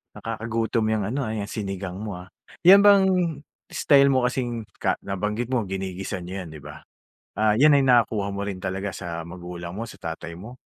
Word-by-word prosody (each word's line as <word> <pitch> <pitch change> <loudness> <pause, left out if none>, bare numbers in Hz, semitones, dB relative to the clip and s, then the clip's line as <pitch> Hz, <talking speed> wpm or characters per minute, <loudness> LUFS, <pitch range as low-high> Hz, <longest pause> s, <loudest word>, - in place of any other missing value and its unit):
nakakagutom 115 0 -2
yang 110 -2 0
ano, 135 +5 -2
ah, 110 - -3
yang 105 -2 -4
sinigang 95 -3 -5
mo, 100 -5 -5
ah. 90 - -14 0.4
Yan 195 +3 +9
bang 200 -1 +7 0.6
style 140 -1 +4
mo 130 - +3
kasing 120 -2 -2 0.2
ka - - +1
nabanggit 105 +5 -3
mo, 125 -4 0
ginigisa 95 -1 -4
niyo 95 +2 -6
'yan, - - -10
'di 75 - -10
ba? 75 +1 -11 0.5
Ah, 110 0 +3
'yan 150 +7 +6
na - - +6
yung 135 - +1
nakukuha 110 -4 +3
mo 100 - -4
rin 95 -2 -4
talaga 95 +1 -2
sa 85 -3 -5
magulang 85 0 -8
mo, 115 +3 -5
sa - - -11
tatay 80 0 -6
mo? 115 +9 -11
105 Hz, 195 wpm, -24 LUFS, 95-115 Hz, 0.6 s, Yan